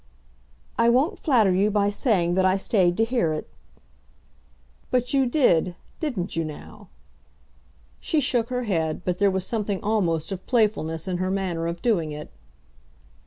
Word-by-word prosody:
"I 230 - +5
won't 275 - +2
flatter 230 - +3
you 195 +3 +2
by 205 -1 +1
saying 200 -6 +1
that 190 +1 +2
I 185 +1 +3
stayed 185 -3 +1
to 225 - +3
hear 225 -9 0
it." 155 - -5 1.4
"But 250 +2 0
you 270 -2 +3
did; 185 - +2 0.2
didn't 225 - -3
you 165 - 0
now?" 155 -1 -10 1.1
She 315 - 0
shook 245 -4 +1
her 250 0 -2
head, 165 -6 -1
but 180 -1 -1
there 200 -1 +4
was 190 -1 -1
something 210 -4 -2
almost 175 -7 0
of 190 -1 -6
playfulness 200 -8 0
in 180 -1 -1
her 185 +1 -1
manner 185 -4 -2
of 170 0 -5
doing 175 -10 +1
it. 150 0 -8
195 Hz, 160 wpm, -24 LUFS, 175-235 Hz, 1.4 s, I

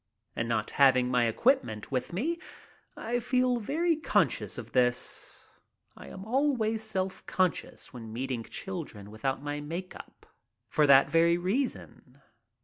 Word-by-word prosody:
And 115 0 -2
not 110 -2 -1
having 130 -2 +5
my 125 -1 +3
equipment 115 - +1
with 130 -2 -2
me, 305 - -1 0.6
I 240 +2 -1
feel 250 +1 +1
very 325 +9 +1
conscious 310 - 0
of - - -8
this. 125 -1 0 0.5
I - - -12
am 190 +1 -9
always 230 -3 +1
self 190 -3 -3
conscious 185 -5 -1
when 115 -3 -8
meeting 125 0 -3
children 145 - -6
without 135 +6 -3
my 145 0 -3
make 170 +5 -6
up - - -13 0.4
for 150 -1 +2
that 140 0 +6
very 170 +1 +4
reason. 185 - -3
170 Hz, 140 wpm, -29 LUFS, -, 0.6 s, that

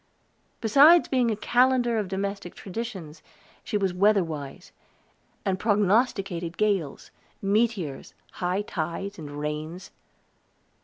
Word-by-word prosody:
Besides 285 +10 +6
being 250 -3 +2
a 220 - 0
calendar 245 +1 +2
of 205 - -2
domestic 195 -1 -4
traditions, 190 -7 -7 0.4
she 210 - -1
was 195 -3 0
weather 200 +1 +4
wise, 145 -4 -7 0.7
and 190 -1 0
prognosticated 200 -5 +1
gales, 200 -9 -1 0.3
meteors, 200 - -1 0.2
high 185 +3 -2
tides, 185 +2 -4
and 150 -2 -7
rains. 150 +5 -5
195 Hz, 105 wpm, -26 LUFS, 170-220 Hz, 0.7 s, Besides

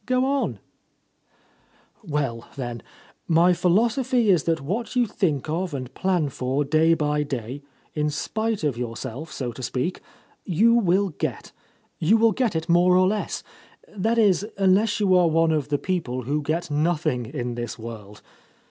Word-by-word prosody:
Go 255 0 +2
onl" 275 +1 0 1.5
"Well, 140 - -3
then, 120 -4 -5 0.5
my 170 +2 +4
philosophy 230 +6 +2
is 170 -6 +2
that 165 -1 +1
what 205 - -4
you 245 -1 +3
think 165 - -1
of 170 +1 -2
and 130 -1 -6
plan 180 -5 0
for 135 +1 -1
day 160 +3 +3
by 150 -1 0
day, 135 -1 -4 0.3
in 150 -1 0
spite 220 +7 -2
of 145 -5 0
yourself, 125 +5 -5
so 125 -3 -4
to 120 - -10
speak 130 +8 -2 0.3
— - - -21
^you 230 +2 +6
will 190 +2 +2
get. 155 - -4 0.5
You 190 +8 +4
will 225 0 +4
get 230 -3 0
it 160 +1 -2
more 180 +1 +4
or 185 0 +4
less. 210 +2 -2 0.5
That 225 +4 0
is, 200 -4 +4
unless 200 +3 +3
you 195 -3 +3
are 180 -1 +5
one 165 0 +3
of 150 -2 -1
the 145 - +1
people 140 -8 -2
who 145 +5 -1
get 160 +2 -2
nothing 150 -5 0
in 125 -2 -4
this 120 -1 -5
world. 110 -3 -9
160 Hz, 165 wpm, -24 LUFS, 135-195 Hz, 1.5 s, ^you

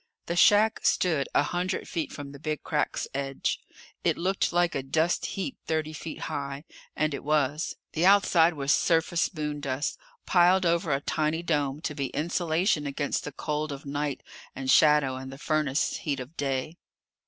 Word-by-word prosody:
The 170 - -2
shack 210 +4 +5
stood 155 -7 +1
a - - +5
hundred 180 +4 -2
feet 165 -3 -3
from 145 -1 -7
the 140 - -11
Big 155 0 -3
Crack's 150 -2 -1
edge. 135 0 -2 0.4
It - - +2
looked 190 +3 0
like 175 0 +2
a - - -1
dust 160 +6 0
heap 225 +7 -3
thirty 155 -1 -1
feet 155 +1 -7
high, 140 0 -4 0.3
and 155 -1 0
it 140 - -5
was. 150 +1 0 0.2
The 160 - 0
outside 175 -4 +5
was 140 0 +1
surface 165 0 +2
moondust, 145 -4 -3 0.3
piled 180 +1 +4
over 170 -1 +1
a 135 0 +1
tiny 155 +3 -1
dome 145 -3 0
to 150 - -3
be 140 -2 -2
insulation 160 +1 0
against 140 +1 -2
the 145 - -5
cold 150 +2 -3
of 140 0 -7
night 145 0 -3 0.3
and 130 0 0
shadow 150 -4 +5
and 130 0 -7
the 135 - -9
furnace 150 -1 0
heat 145 -4 -2
of 130 +6 -8
day. 140 +3 -2
150 Hz, 170 wpm, -27 LUFS, 140-170 Hz, 0.4 s, shack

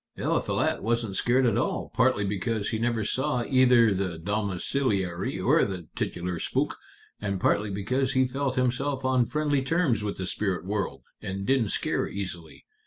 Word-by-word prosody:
Eliphalet - - 0
wasn't 115 -3 -1
scared 125 +5 +3
at 115 -4 +2
all, - - -2
partly 100 - +2
because 100 +2 -1
he 110 - -1
never 115 -1 0
saw 130 +3 0
either 125 -5 +5
the 90 -3 -2
domiciliary 100 +1 -1
or - - +4
the 90 -5 -4
titular 90 -1 -3
spook, - - -1 0.4
and 100 -2 -2
partly 105 +3 +2
because 125 +7 -1
he 130 -1 +4
felt 135 +1 -2
himself 130 +2 0
on 130 -2 +3
friendly 150 -2 +1
terms 135 -6 +1
with 105 -1 -3
the 95 - -3
spirit 95 -1 -1
world, 100 0 -3 0.2
and 95 +1 -4
didn't 130 -4 +2
scare - - 0
easily. 90 -5 -6
110 Hz, 160 wpm, -27 LUFS, 95-130 Hz, 0.4 s, either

